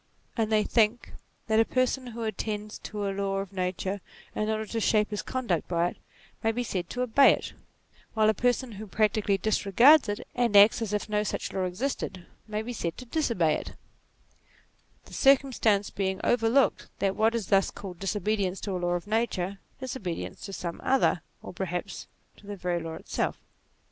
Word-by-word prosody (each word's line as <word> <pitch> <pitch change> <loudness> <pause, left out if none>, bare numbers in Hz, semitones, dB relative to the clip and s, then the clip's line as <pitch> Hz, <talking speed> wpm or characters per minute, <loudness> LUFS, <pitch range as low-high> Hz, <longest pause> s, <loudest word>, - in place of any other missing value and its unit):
And 225 -2 0
they 215 -1 +4
think, 225 +1 +1 0.3
that 220 0 +2
a - - +7
person 255 +2 0
who 235 -1 -6
attends 215 -1 -4
to 205 -1 -4
a 195 - -1
law 195 0 -1
of 195 0 -4
nature 185 +1 -2 0.3
in 215 0 -1
order 220 0 -1
to 225 +1 -3
shape 215 -1 +2
his 210 - -2
conduct 235 -11 -2
by 170 0 +1
it, - - -12 0.4
may 225 - +2
be 245 +2 -2
said 180 -6 -3
to 250 - -2
obey 250 +3 +6
it, - - -5 0.6
while 215 -1 +4
a 220 - +5
person 245 +3 0
who 215 +1 -8
practically 210 0 +1
disregards 220 - +5
it, 205 - -3
and 235 -4 +3
acts 205 +3 +7
as 220 -3 -2
if 210 0 -1
no 210 -1 +1
such 210 - -3
law 190 -1 0
existed, 185 -2 -3 0.2
may 215 0 -3
be 245 +2 -5
said 170 -7 -3
to 255 - -8
disobey 230 - +1
it: - - -5 1.3
the - - -15
circumstance 260 -7 +3
being 190 -1 -2
overlooked, 240 +3 +2
that 195 -1 0
what 225 +2 +2
is 225 -5 -3
thus 195 -1 +4
called 190 -4 -9
disobedience 195 -1 -1
to 200 - -3
a - - -2
law 175 0 0
of 175 +1 -2
nature 205 -3 -1 0.2
is 260 -1 -4
obedience 180 -9 -5
to - - -7
some 175 -3 -5
other 260 -9 +2 0.2
or - - -8
perhaps 180 +1 -4 0.3
to 200 - -17
the 205 - -5
very 175 -2 -1
law 165 0 -5
itself. - - -2
210 Hz, 190 wpm, -28 LUFS, 190-230 Hz, 1.3 s, a